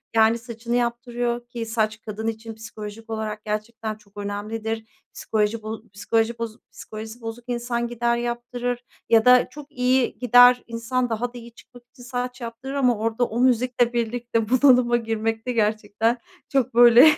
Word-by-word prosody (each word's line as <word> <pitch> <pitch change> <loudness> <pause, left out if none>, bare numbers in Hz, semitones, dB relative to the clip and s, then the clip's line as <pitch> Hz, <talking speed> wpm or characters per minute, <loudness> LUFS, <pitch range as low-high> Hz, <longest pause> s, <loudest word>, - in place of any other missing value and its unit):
yani 225 +1 +5
saçını 235 0 -4
yaptırıyor 240 0 -1
ki 235 -1 -5
saç 220 -1 -1
kadın 220 +1 -5
için 225 0 -4
psikolojik 220 0 -9
olarak 215 -1 -4
gerçekten 215 +1 -3
çok 205 -1 -23
önemlidir. 220 +2 -4 0.3
Psikoloji 215 0 -1
bo 220 0 -5
psikoloji 225 +3 0
boz 230 -1 -4
psikolojisi 220 +2 -9
bozuk 225 +1 -6
insan 240 0 -2
gider 235 0 0
yaptırır 240 +1 -3 0.3
ya 225 0 +5
da 250 0 +6
çok 295 0 -11
iyi 255 -1 +1
gider 245 0 +7
insan 235 +2 -1
daha 240 +2 -2
da - - -8
iyi 235 0 -11
çıkmak 245 0 -17
için 245 - -15
saç 245 0 -4
yaptırır 235 +4 -6
ama 250 -5 +2
orada 225 +2 0
o 230 +2 -4
müzikle 245 -1 +2
birlikte 235 -1 -1
bunalıma 250 -2 +5
girmekte 225 +1 -2
gerçekten 220 +1 +1 0.3
çok 260 -4 +1
böyle 240 +5 +9
235 Hz, 155 wpm, -24 LUFS, 220-245 Hz, 0.3 s, böyle